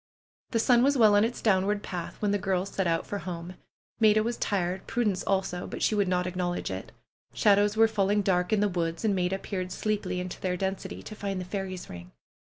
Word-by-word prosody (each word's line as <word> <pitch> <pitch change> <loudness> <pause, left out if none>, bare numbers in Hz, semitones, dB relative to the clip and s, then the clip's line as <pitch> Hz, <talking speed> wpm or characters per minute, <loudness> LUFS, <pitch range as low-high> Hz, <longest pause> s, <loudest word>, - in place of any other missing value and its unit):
The 230 - 0
sun 235 +1 +4
was 275 +2 +3
well 215 -3 +6
on 205 - +5
its 235 +2 -2
downward 205 0 +2
path 175 -2 -6
when 205 - +2
the 205 - +1
girls 190 0 -1
set 190 -2 -1
out 165 -1 0
for 205 - -4
home. 175 -1 -6 0.5
Maida 215 -1 +5
was 235 +2 -1
tired; 185 -3 -2
Prudence 210 -6 0
also, 190 -2 -1
but - - -5
she - - +3
would 205 -2 +2
not 180 0 +1
acknowledge 180 - -2
it. 95 0 -6 0.4
Shadows 205 +1 +3
were 225 0 +6
fall 200 -3 0
ing 205 0 +2
dark 180 -1 +1
in 215 -2 +3
the 210 - +3
woods, 170 0 -2
and 210 - +3
Maida 185 0 0
peered 185 -2 -4
sleepily 210 -3 -2
into 180 0 -6
their 180 -1 -1
density, 190 +1 -4
to - - -8
find 200 -2 -3
the 180 - -5
fairies' 185 -1 -5
ring. 90 0 -10
195 Hz, 220 wpm, -28 LUFS, 180-210 Hz, 0.5 s, well